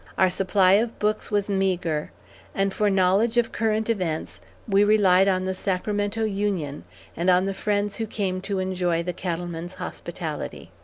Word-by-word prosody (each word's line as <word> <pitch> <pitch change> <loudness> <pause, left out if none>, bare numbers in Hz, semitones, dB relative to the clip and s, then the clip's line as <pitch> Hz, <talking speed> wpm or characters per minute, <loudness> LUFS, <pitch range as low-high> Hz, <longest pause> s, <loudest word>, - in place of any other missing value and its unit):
Our 185 -1 +4
supply 185 0 +3
of 230 +1 -2
books 210 +1 -1
was 205 -2 0
meagre, 185 -6 0 0.5
and 195 0 +1
for 210 +1 +2
knowledge 195 +5 +2
of 240 -1 +2
current 220 -1 0
events, 180 -9 -2 0.3
we 200 -1 +4
relied 195 -3 +5
on 185 -1 +1
The 190 - -1
Sacramento 205 +3 -1
Union, 195 - -2 0.3
and 175 +3 0
on 180 +1 +4
the 195 - -1
friends 205 0 -1
who 225 -1 -2
came 190 -3 -2
to 200 +1 -3
enjoy 180 -3 0
the 180 +1 -3
cattleman's 175 0 -4
hospitality. - - -6
195 Hz, 160 wpm, -24 LUFS, 180-205 Hz, 0.5 s, relied